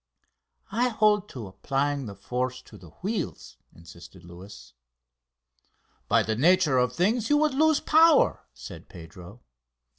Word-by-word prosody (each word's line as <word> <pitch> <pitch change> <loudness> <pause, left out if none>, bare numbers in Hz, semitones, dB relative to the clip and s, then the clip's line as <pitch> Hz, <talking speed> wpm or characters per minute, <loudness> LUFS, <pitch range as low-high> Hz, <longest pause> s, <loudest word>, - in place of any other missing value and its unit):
"I 240 +4 +1
hold 210 -3 +1
to 120 -5 -8
applying 135 +7 -3
the 100 - -9
force 125 +5 -4
to - - -16
the 90 -4 -14
wheels," 200 -3 -5 0.2
insisted 85 +2 -15
Luis. 90 +4 -13 1.3
"By - - +2
the 110 - -2
nature 155 0 +3
of 125 0 +1
things 215 +6 0
you 295 - +4
would 305 -1 +1
lose 315 +2 +2
power," 320 -1 +3
said - - -12
Pedro. 85 +6 -13
135 Hz, 130 wpm, -25 LUFS, -, 1.3 s, you